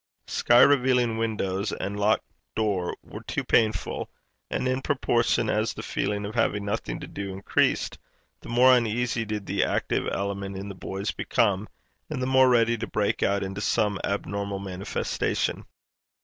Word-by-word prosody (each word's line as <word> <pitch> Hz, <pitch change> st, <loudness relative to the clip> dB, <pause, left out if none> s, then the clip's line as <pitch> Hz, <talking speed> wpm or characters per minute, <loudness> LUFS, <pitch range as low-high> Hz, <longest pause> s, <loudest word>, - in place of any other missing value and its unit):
Sky 120 Hz, +1 st, +4 dB
revealing 125 Hz, -4 st, +3 dB
windows 105 Hz, -3 st, -1 dB
and 100 Hz, +2 st, -4 dB
locked 105 Hz, +2 st, +2 dB, 0.3 s
door 100 Hz, -5 st, 0 dB
were -, -, -9 dB
too -, -, -3 dB
painful; 110 Hz, -2 st, +1 dB, 0.4 s
and 130 Hz, -, -1 dB
in 130 Hz, +1 st, 0 dB
proportion 120 Hz, -4 st, +1 dB
as 110 Hz, +1 st, 0 dB
the -, -, -6 dB
feeling 105 Hz, 0 st, -2 dB
of 105 Hz, -, -5 dB
having 105 Hz, -3 st, +1 dB
nothing 105 Hz, +2 st, -3 dB
to -, -, -5 dB
do 100 Hz, -1 st, -6 dB
increased, 95 Hz, +1 st, 0 dB, 0.4 s
the -, -, -12 dB
more 125 Hz, +2 st, +6 dB
uneasy 120 Hz, 0 st, 0 dB
did 105 Hz, -1 st, -4 dB
the -, -, +1 dB
active -, -, 0 dB
element 100 Hz, 0 st, -3 dB
in 100 Hz, +1 st, -6 dB
the -, -, -5 dB
boys 95 Hz, +2 st, -4 dB
become, 105 Hz, -3 st, 0 dB, 0.4 s
and 150 Hz, -4 st, -3 dB
the 130 Hz, -, -1 dB
more 130 Hz, 0 st, +5 dB
ready 115 Hz, -1 st, +3 dB
to 115 Hz, -, -3 dB
break 105 Hz, -1 st, 0 dB
out 100 Hz, 0 st, +2 dB
into 95 Hz, +1 st, -4 dB
some 105 Hz, -2 st, +1 dB
abnormal 100 Hz, 0 st, -2 dB
manifestation. 95 Hz, -1 st, -2 dB
105 Hz, 160 wpm, -26 LUFS, 100-120 Hz, 0.4 s, more